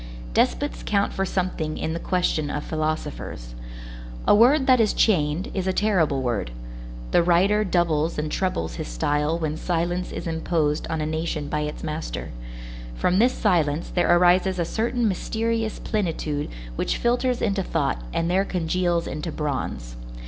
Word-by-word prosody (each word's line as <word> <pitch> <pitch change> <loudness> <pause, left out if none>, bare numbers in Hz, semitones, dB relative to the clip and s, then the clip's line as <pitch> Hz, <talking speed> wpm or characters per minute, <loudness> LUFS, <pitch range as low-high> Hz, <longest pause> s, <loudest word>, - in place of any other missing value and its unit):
Despots - - +1
count - - +1
for 195 - 0
something 180 -5 -2
in 160 - -2
the 165 - -3
question 170 -5 0
of 150 0 -3
philosophers. 155 - -4 0.7
A - - +7
word 260 +7 +5
that 255 -2 +5
is 220 -2 +3
chained 175 +1 +2
is 190 -1 -2
a 190 - +2
terrible 170 -11 +2
word. 115 - -1 0.6
The - - +5
writer 185 +5 +3
doubles 170 -4 +1
and 150 0 -2
trebles 85 - -1
his - - -4
style 145 - 0
when 155 -2 -2
silence 175 +1 -1
is - - -5
imposed 160 -2 0
on 160 -1 -2
a - - -1
nation 155 -1 -2
by 150 - -1
its 150 0 -4
master. 155 0 -4 0.6
From 180 - +2
this 245 +3 +4
silence 165 -6 +1
there 175 - +2
arises 180 +1 +4
a 170 - 0
certain 235 +4 0
mysterious 225 +3 -1
plenitude 160 -8 -2 0.3
which - - 0
filters 245 +1 +1
into 200 -3 0
thought 145 - -1
and 165 - 0
there 185 +3 +2
congeals 175 -2 0
into 155 +2 -4
bronze. 130 - -3
170 Hz, 155 wpm, -24 LUFS, 150-190 Hz, 0.7 s, A